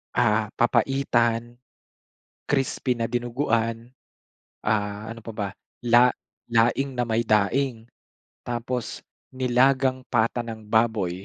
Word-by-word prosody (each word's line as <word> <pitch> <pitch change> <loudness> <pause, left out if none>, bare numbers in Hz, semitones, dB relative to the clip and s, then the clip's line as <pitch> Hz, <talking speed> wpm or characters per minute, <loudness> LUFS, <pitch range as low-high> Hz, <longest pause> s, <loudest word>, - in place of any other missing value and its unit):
Ah, 110 -3 +2
papaitan, 120 -1 +1 0.9
crispy 135 -2 0
na 115 - -1
dinuguan. 115 -1 -1 0.8
Ah, 105 0 -1
ano 115 0 -8
pa 115 - -7
ba? 105 -2 -3 0.4
La 120 +1 +6 0.4
laing 120 +4 +2
na 120 - +1
may 115 0 +1
daing. 115 +2 +1 0.6
Tapos, 120 -1 -4 0.3
nilagang 130 +1 +2
pata 115 +2 +1
ng 110 -2 -8
baboy. 105 -5 +1
115 Hz, 100 wpm, -25 LUFS, 110-125 Hz, 0.9 s, La